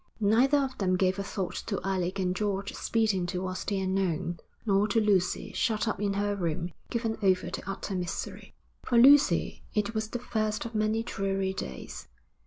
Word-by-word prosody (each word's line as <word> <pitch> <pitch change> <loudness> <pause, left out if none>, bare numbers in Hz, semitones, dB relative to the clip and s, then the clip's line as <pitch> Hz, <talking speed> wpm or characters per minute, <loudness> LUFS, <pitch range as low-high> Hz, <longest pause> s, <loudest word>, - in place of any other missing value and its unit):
Neither 235 +7 +4
of 270 -2 -2
them 185 -2 +2
gave 185 +1 +1
a - - -1
thought 190 -3 -3
to 200 - -1
Alec 190 -1 -1
and 185 -1 0
George 200 -1 -2
speeding 215 -6 0
towards 185 0 -3
the 200 -2 0
unknown, 185 -3 -1 0.3
nor 200 -1 +3
to 215 +2 +2
Lucy 200 -4 +1
shut 215 -2 0
up 210 - -1
in 200 -1 +1
her 205 0 0
room, 170 -2 -2 0.2
given 225 -2 -2
over 185 -2 +2
to - - -5
utter 195 0 -4
misery. 180 -2 -4 0.3
For 240 - +1
Lucy 280 +4 +5
it 210 +1 0
was 220 -1 -1
the 245 - -3
first 215 -3 -2
of 230 - -6
many 215 +1 +1
dreary 195 -3 -1
days. 65 - -7
200 Hz, 180 wpm, -29 LUFS, 185-220 Hz, 0.3 s, Lucy